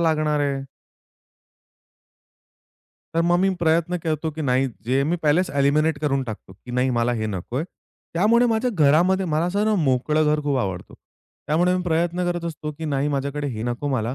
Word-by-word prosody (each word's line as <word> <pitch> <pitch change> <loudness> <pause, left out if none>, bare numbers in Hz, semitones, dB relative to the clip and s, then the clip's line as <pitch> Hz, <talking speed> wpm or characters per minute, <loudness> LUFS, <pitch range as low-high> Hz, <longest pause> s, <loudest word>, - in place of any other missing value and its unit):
लागणार 155 -2 +1
आहे. 140 -1 -1 2.5
तर 165 - +2
मग 175 +1 +3
मी 195 - +3
प्रयत्न 170 +2 +2
करतो, 160 -1 -2
की 155 +1 -6
नाही 130 0 +1 0.2
जे 135 +2 +2
मी 175 - +1
पहिलेच 165 +5 +2
एलिमिनेट 145 +2 +2
करून 140 -3 0
टाकतो, 110 -4 -8
की 115 +5 -13
नाही 125 +1 +1
मला 120 +1 +1
हे 110 - -1
नकोय. 110 - -3 0.5
त्यामुळे 230 +7 +4
माझ्या 230 +2 +1
घरामध्ये 175 +5 +3
मला 155 +1 0
असं 200 +4 0
ना 215 -1 +2
मोकळं 145 +4 +2
घर 150 - -1
खूप 145 -2 0
आवडतं. 95 -5 -4 0.5
त्यामुळे 175 +5 +2
मी 180 - -2
प्रयत्न 175 +1 0
करत 175 -1 -3
असतो, 155 -2 -5
की 160 - -5
नाही 145 -1 0
माझ्याकडे 140 +1 -2
हे 110 -3 -5
नको 120 +4 -3
मला, 125 -2 -1
150 Hz, 175 wpm, -23 LUFS, 135-170 Hz, 2.5 s, त्यामुळे